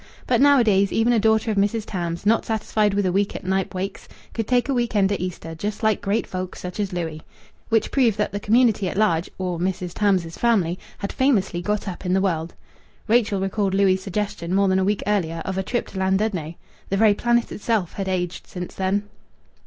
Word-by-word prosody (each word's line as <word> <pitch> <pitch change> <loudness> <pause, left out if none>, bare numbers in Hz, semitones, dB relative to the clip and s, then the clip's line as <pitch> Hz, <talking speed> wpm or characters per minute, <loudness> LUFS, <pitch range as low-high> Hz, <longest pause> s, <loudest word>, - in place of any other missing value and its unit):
But 245 -1 +2
nowadays 225 -9 +5
even 230 +2 +2
a 230 - +3
daughter 220 +1 +2
of 210 - -2
Mrs. 205 +2 +1
Tams, 170 -3 -4
not 225 +2 +3
satisfied 215 -2 0
with 205 -1 +1
a 185 - +2
week 200 +2 0
at - - -6
Knype 190 0 -1
Wakes, 190 +2 -4 0.3
could 225 -2 -3
take 250 0 +2
a 275 - 0
week 240 -3 -1
end 200 -1 +3
at 200 - -1
Easter 175 -2 -5
just 205 +7 -4
like 220 -1 +2
great 205 +3 0
folk 185 -1 -5
such 180 +3 -7
as 205 -2 -1
Louis. 165 -3 -4 0.5
Which 225 -1 +1
proved 235 -6 +3
that 210 - 0
the 205 - -3
community 215 -3 +3
at - - -5
large, 175 -6 +2
or 180 -2 -3
Mrs. 180 -1 -2
Tams's 185 -6 0
family, 195 -7 +2 0.2
had 200 - -5
famously 200 -10 +1
got 210 +3 -2
up 185 -1 -6
in 180 -1 0
the 190 - +3
world. 170 -4 -1 0.5
Rachel 220 -3 +2
recalled 195 0 0
Louis' 195 -1 +4
suggestion, 190 -2 -3
more 200 0 +3
than 190 0 +3
a - - +2
week 205 +1 0
earlier, 165 -6 -1
of 190 0 -2
a - - +1
trip 240 +5 -2
to 190 - -6
Llandudno. 190 -4 0 0.3
The 195 - 0
very 215 0 +5
planet 240 +2 +1
itself 210 -5 -1
had 195 -1 -4
aged 180 -1 -3
since 180 -1 -7
then. 195 +2 0
200 Hz, 215 wpm, -23 LUFS, 185-215 Hz, 0.5 s, nowadays